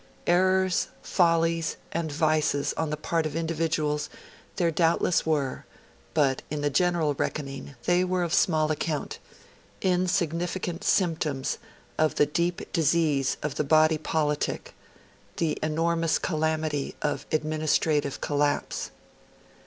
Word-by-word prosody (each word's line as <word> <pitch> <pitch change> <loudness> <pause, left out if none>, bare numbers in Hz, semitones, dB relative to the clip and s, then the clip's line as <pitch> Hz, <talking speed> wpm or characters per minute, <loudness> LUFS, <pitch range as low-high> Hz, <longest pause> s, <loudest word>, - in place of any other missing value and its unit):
Errors, 185 +1 +3 0.2
follies, 165 -2 +2
and 165 -2 -2
vices 150 -1 +1
on 160 -1 -1
the 150 - -2
part 160 +1 0
of 150 - -7
individuals 160 -2 -1 0.5
there 175 -3 +1
doubtless 165 +1 +2
were; 145 -5 0 0.5
but, 140 -4 +2
in 150 0 -3
the 145 0 0
general 170 -1 +2
reckoning, 140 -1 -4
they 180 +1 +3
were 185 -1 0
of 170 - -2
small 155 -3 +3
account 155 0 -3 0.6
insignificant 180 0 0
symptoms 160 -9 0 0.4
of 155 0 +2
the 150 - +4
deep 170 +4 -2
disease 155 -4 +2
of 150 -2 -1
the - - +1
body 155 +1 +4
politic 150 -1 -1 0.6
to - - -2
the 155 - -1
enormous 165 +1 +1
calamity 155 -3 -1
of 150 - -2
administrative 155 -2 0
collapse. 145 0 0
155 Hz, 120 wpm, -27 LUFS, 150-170 Hz, 0.6 s, the